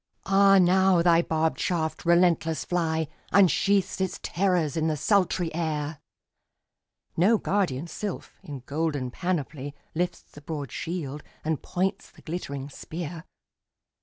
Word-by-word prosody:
—Ah 195 0 +6
now 185 -1 +4
thy 170 -1 +5
barbed 160 -1 0
shaft, 160 -3 -1
relentless 170 -2 +3
fly, 160 -3 0 0.2
Unsheaths 195 0 +3
its 190 - -2
terrors 175 -5 +1
in 160 -1 +1
the 155 -1 0
sultry 185 -2 +1
air! 155 -2 -2 1.2
No 205 +7 +4
guardian 180 -10 0
sylph, 190 +4 -6
in 140 -3 -8
golden 145 -4 -2
panoply, 145 -4 -3 0.2
Lifts 175 +2 -2
the 145 - -13
broad 145 -3 -5
shield, 155 -4 -4 0.2
and 155 -2 -1
points 190 +2 -2
the - - -19
glittering 140 -5 -5
spear. 165 +3 -7
165 Hz, 125 wpm, -26 LUFS, 155-180 Hz, 1.2 s, Ah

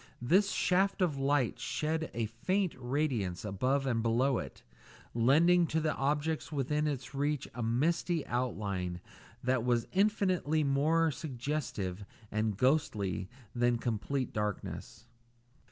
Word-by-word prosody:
This 185 +11 +3
shaft 190 +2 +2
of 150 -6 0
light 135 -2 +1
shed 160 +1 -1
a 115 -1 0
faint 180 - -1
radiance 120 - -1
above 130 +8 0
and 120 -4 +1
below 120 +3 +2
it, 70 - -8 0.5
lending 165 +9 +4
to 160 - 0
the 155 -1 0
objects 150 +3 -1
within 150 +1 0
its 135 -4 -4
reach 145 0 -1
a 120 - -5
misty 155 +8 +1
outline 100 -8 -2 0.4
that 125 -1 +1
was 120 -2 +2
infinitely 185 -6 +2
more 155 +4 +3
suggestive 130 - -3 0.3
and 110 -1 0
ghostly 105 - +1 0.2
than 120 0 +2
complete 120 +3 -2
darkness. 105 -1 -4
135 Hz, 120 wpm, -32 LUFS, 115-155 Hz, 0.5 s, lending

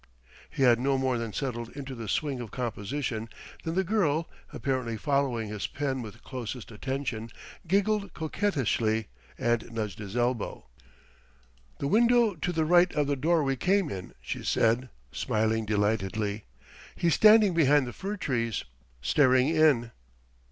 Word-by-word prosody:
He 135 - -1
had 120 -2 +5
no 135 +1 +1
more 130 -2 0
than 115 -2 -4
settled 120 -2 -3
into 135 -1 -6
the 115 -3 -7
swing 140 +4 -1
of 115 - -7
composition, 115 0 -3 0.3
than 165 0 -3
the 190 - +2
girl 170 -5 +1 0.2
apparently 130 -5 -2
following 125 -2 0
his 105 -1 -3
pen 135 -2 -2
with 110 -4 -10
closest 125 -2 -6
attention 120 -1 -4 0.4
giggled 200 +2 +1
coquettishly 130 - 0 0.3
and 120 -1 0
nudged 105 -4 -4
his 105 +2 -6
elbow. 120 -2 -1 1.1
"The - - -4
window 235 +3 +4
to 175 +1 -3
the 160 -2 0
right 175 +2 +5
of 150 - +2
the 140 0 0
door 160 +4 +2
we 135 -1 0
came 185 +4 +1
in," 95 -2 -7
she - - -5
said, 120 +3 +2 0.2
smiling 110 0 0
delightedly; 105 0 -1 0.5
"he's 170 -2 +2
standing 215 +1 +6
behind 145 -4 +4
the 120 - -6
fir 200 +2 -4
trees, 115 - -1 0.4
staring 130 - +4
in." 150 -8 +3
130 Hz, 145 wpm, -28 LUFS, 115-160 Hz, 1.1 s, standing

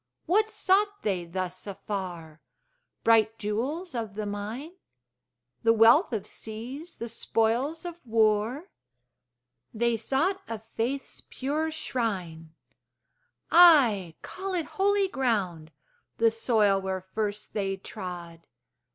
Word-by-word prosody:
What 425 +6 +3
sought 405 -1 +1
they 185 -4 -1
thus 185 +2 -5
afar? 180 -6 -6 0.6
Bright 225 -1 +4
jewels 260 - -3
of 225 -4 -4
the 215 0 -3
mine? 210 +9 -5 0.9
The 225 0 +4
wealth 230 - +6
of 210 -4 -2
seas, 245 +12 -7
the 235 - -5
spoils 235 +8 0
of 345 -1 -6
war? 225 - +1 1.0
They 235 +1 +1
sought 290 - 0
a 225 0 -4 0.2
faith's 265 +5 -2
pure 300 +4 -2
shrine! 185 - -3 1.0
Ay, 250 - +6
call 380 0 -5
it 335 -3 -1 0.2
holy 405 0 +3
ground, 200 - -1 0.5
The 225 0 +4
soil 215 -4 +2
where 190 -1 -3
first 210 -1 -3
they 195 -2 -1
trod. 175 -3 -8
225 Hz, 110 wpm, -27 LUFS, 200-290 Hz, 1.0 s, wealth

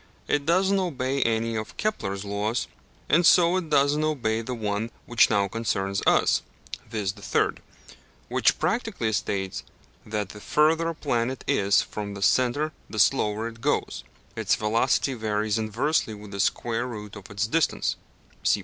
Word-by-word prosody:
It 145 0 0
does 185 +3 +3
not 195 -1 +2
obey 135 -3 -2
any 115 0 +1
of 110 0 -5
Kepler's 100 - -2
laws, 105 +3 -1 0.4
and 170 +4 +4
so 170 +1 +6
it 175 -4 -3
does 145 -1 +3
not 155 +1 +1
obey 115 -7 0
the 125 +2 -4
one 105 0 -2 0.2
which 120 -1 +4
now 100 -2 +2
concerns 100 -3 -1
us, - - +4 0.5
viz. 105 -4 -2
the 100 - -15
third; - - 0 0.7
which - - +2
practically 205 - -1
states 95 -2 -2 0.4
that 105 -1 -3
the 105 - -10
further 160 +5 +2
a 165 - -4
planet 130 -3 -1
is 100 0 +3
from 100 -1 -6
the 100 - -4
centre 130 +7 +2 0.2
the 110 - -7
slower 110 0 +2
it 115 0 -10
goes; - - -1 0.3
its - - +1
velocity 115 +5 +1
varies 110 -2 -1
inversely 110 +2 0
with 105 -1 -11
the 100 - -6
square 120 +4 0
root 105 -3 -8
of 100 -3 -11
its 100 +1 -1
distance 160 +8 +1 0.5
(p. - - +3
115 Hz, 165 wpm, -26 LUFS, 105-145 Hz, 0.7 s, so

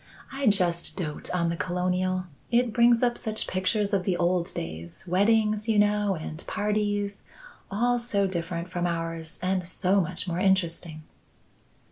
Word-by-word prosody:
I 270 -1 -1
just 180 -5 +2
dote 155 -6 -3
on 170 -2 +1
the 170 - -1
Colonial. 185 +1 -1 0.2
It 240 -1 +2
brings 235 0 +5
up 240 -1 +2
such 220 0 -3
pictures 200 +3 0
of 195 -2 +2
the 180 -2 0
old 175 0 +1
days; 80 +2 -6
weddings, 215 +3 +2
you 220 - +3
know, 205 -1 +3
and 155 0 -7
parties; 205 -1 -1 0.5
all 240 +5 +1
so 205 -4 0
different 170 -2 -3
from 175 -1 -1
ours 165 -1 -4
and 185 0 +1
so 185 +2 +1
much 180 +2 -4
more 175 0 -1
interesting." 170 -4 0
185 Hz, 150 wpm, -27 LUFS, 170-210 Hz, 0.5 s, brings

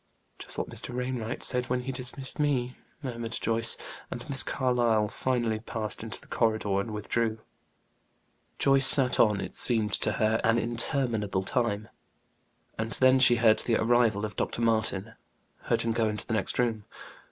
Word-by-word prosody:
"Just - - -5
what - - -3
Mr. 120 - -5
Wainwright 125 -2 -4
said 125 -1 0
when 125 0 -1
he 130 +2 -5
dismissed 130 +2 -6
me," 130 -4 0 0.3
murmured 115 -3 -5
Joyce. 115 0 +2 0.3
And 120 - -7
Miss 135 -1 +3
Carlyle 120 -5 +1
finally 120 -3 -1
passed 110 -1 -5
into 110 0 -7
the - - -18
corridor 110 -4 0
and 100 - -4
withdrew. 110 +1 -2 1.2
Joyce 135 -1 +4
sat 130 -3 +7
on; 105 -3 +4
it - - -6
seemed 110 -4 +2
to - - +1
her 110 +1 +1
an 115 +1 +3
interminable 115 -4 0
time. 110 -1 -1 0.9
And 110 +1 -3
then 130 0 +4
she 130 -2 +6
heard 115 -2 +3
the 115 - +1
arrival 110 -2 +2
of 105 - -7
Dr. 120 - -2
Martin; 110 -2 0 0.5
heard - - +1
him 115 - -1
go 110 -1 0
into 105 0 -3
the - - -4
next 110 -4 -1
room. 115 -4 0
115 Hz, 165 wpm, -27 LUFS, 110-125 Hz, 1.2 s, sat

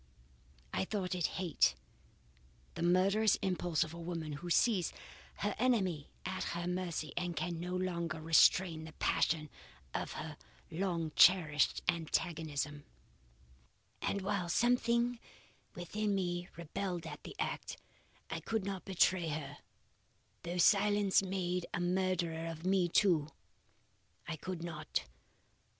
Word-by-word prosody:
"I - - +1
thought 190 -3 -2
it 175 -3 +1
hate 165 - +2 1.0
the - - -6
murderous 190 +5 +4
impulse 175 -4 +1
of 160 0 -8
a 170 - -8
woman 165 -2 -4
who 175 - -5
sees 185 -1 +3 0.4
her 205 0 -1
enemy 190 - +1 0.2
at 185 0 -2
her 170 0 -3
mercy 180 -3 -3
and 175 -1 -2
can 175 -2 -2
no 180 +2 -3
longer 170 -3 -2
restrain 160 +1 +4
the 160 - -10
passion 155 -1 +1 0.4
of - - -3
her - - -6 0.3
long 170 -2 -1
cherished 160 -5 +5
antagonism; 155 -3 -1 1.2
and 200 -1 -1
while 195 -3 -1
something 240 +2 +2 0.6
within 205 +4 -1
me 175 -2 -2
rebelled 170 +1 -4
at - - -7
the - - -9
act, - - -3 0.5
I - - -4
could 220 -3 -2
not 195 -2 -4
betray 185 -2 +3
her, 145 -2 -4 0.8
though 175 +1 -4
silence 205 +1 +4
made 180 -2 -2
a - - -1
murderer 175 -2 0
of 165 +1 -6
me 185 -2 +3
too. 170 -6 +3 1.0
I 170 - -2
could 170 +2 -5
not. 170 - -3
175 Hz, 125 wpm, -34 LUFS, 165-190 Hz, 1.2 s, cherished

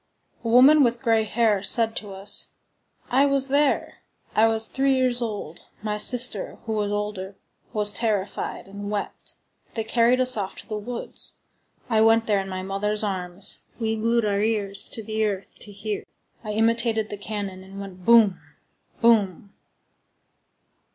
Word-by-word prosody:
A - - -4
woman 265 +6 +7
with 240 -1 0
gray 225 -2 +3
hair 215 -2 +1
said 225 +2 +2
to 205 -2 -6
us: 195 +1 +2 0.6
"I 270 +3 +4
was 275 -1 +1
there. 285 +1 +1 0.4
I 220 +1 +5
was 225 0 +1
three 270 0 +1
years 255 -2 +1
old. 205 -8 -5 0.2
My 210 -1 -2
sister, 245 -3 +2
who 220 - -2
was 210 -1 -1
older, 205 -2 -4 0.4
was 210 -2 +1
terrified 210 -3 -2
and 200 +1 -7
wept. 205 -1 -5 0.4
They 225 - -1
carried 235 +3 +3
us 255 0 +4
off 195 -3 -4
to - - -10
the 215 - -4
woods. 240 +3 -5 0.5
I 220 -3 +2
went 225 0 +4
there 205 -2 +2
in 195 0 -5
my 185 0 -4
mother's 210 +2 -2
arms. 190 -1 -4 0.2
We 225 -1 0
glued 230 +1 +1
our 200 -1 0
ears 210 -2 0
to 225 - -5
the 220 +1 -2
earth 200 -2 -3
to 210 - -8
hear. 205 +1 -5 0.4
I 210 -1 -4
imitated 225 0 +1
the - - -3
cannon, 200 -2 -5
and 195 +1 -11
went 190 -2 -9
_boum! 225 -3 +5 0.6
boum! 205 -4 +2
215 Hz, 160 wpm, -24 LUFS, 200-230 Hz, 0.6 s, woman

